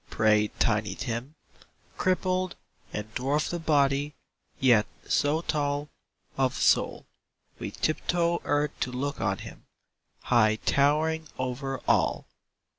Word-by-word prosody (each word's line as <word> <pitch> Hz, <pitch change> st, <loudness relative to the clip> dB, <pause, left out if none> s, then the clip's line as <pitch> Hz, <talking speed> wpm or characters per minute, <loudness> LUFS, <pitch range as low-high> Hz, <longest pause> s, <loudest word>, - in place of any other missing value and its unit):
" -, -, -31 dB
prayed 105 Hz, -1 st, +3 dB
Tiny 105 Hz, -3 st, +1 dB
Tim, 130 Hz, +3 st, -4 dB, 0.6 s
Crippled, 185 Hz, 0 st, 0 dB, 0.4 s
and 105 Hz, +1 st, -6 dB
dwarfed 140 Hz, +7 st, 0 dB
of 170 Hz, -2 st, -5 dB
body, 140 Hz, -1 st, +2 dB, 0.4 s
yet 120 Hz, -5 st, +4 dB, 0.2 s
so 150 Hz, +3 st, +2 dB
tall 145 Hz, -2 st, -1 dB, 0.5 s
Of 130 Hz, -1 st, +2 dB
soul, -, -, +2 dB, 0.5 s
we -, -, -4 dB
tiptoe 170 Hz, +2 st, 0 dB
earth 145 Hz, 0 st, +1 dB
to 125 Hz, -, -1 dB
look 140 Hz, +3 st, -3 dB
on 95 Hz, 0 st, 0 dB
him, -, -, -11 dB, 0.6 s
High 110 Hz, -3 st, +4 dB
towering 155 Hz, +6 st, +1 dB
over 130 Hz, +1 st, -3 dB
all. -, -, +2 dB
140 Hz, 115 wpm, -27 LUFS, 120-155 Hz, 0.6 s, yet